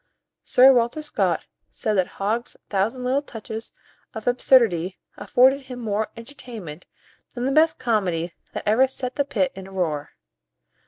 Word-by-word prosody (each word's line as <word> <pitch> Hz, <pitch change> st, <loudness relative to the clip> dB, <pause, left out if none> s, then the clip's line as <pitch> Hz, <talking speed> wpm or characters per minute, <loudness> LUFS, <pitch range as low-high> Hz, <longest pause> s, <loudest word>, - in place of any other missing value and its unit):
Sir 265 Hz, +2 st, +6 dB
Walter 245 Hz, +5 st, +1 dB
Scott 300 Hz, -, 0 dB, 0.2 s
said 215 Hz, -, -2 dB
that 185 Hz, -3 st, +2 dB
Hogg's 220 Hz, +5 st, -2 dB
thousand 220 Hz, +6 st, 0 dB
little 260 Hz, +3 st, +1 dB
touches 225 Hz, -4 st, -8 dB, 0.4 s
of 220 Hz, -, -6 dB
absurdity 225 Hz, -8 st, +3 dB, 0.2 s
afforded 265 Hz, +3 st, +3 dB
him 250 Hz, -2 st, -7 dB
more 220 Hz, -2 st, -1 dB
entertainment 230 Hz, -, -9 dB, 0.5 s
than 245 Hz, 0 st, -2 dB
the 270 Hz, -, +1 dB
best 315 Hz, +3 st, +4 dB
comedy 185 Hz, -8 st, -1 dB, 0.2 s
that -, -, -5 dB
ever 235 Hz, +6 st, +5 dB
set 255 Hz, -1 st, -5 dB
the 285 Hz, -, +1 dB
pit 275 Hz, -1 st, 0 dB
in 190 Hz, 0 st, -9 dB
a -, -, -13 dB
roar. 155 Hz, -6 st, -2 dB
230 Hz, 150 wpm, -23 LUFS, 195-260 Hz, 0.5 s, Sir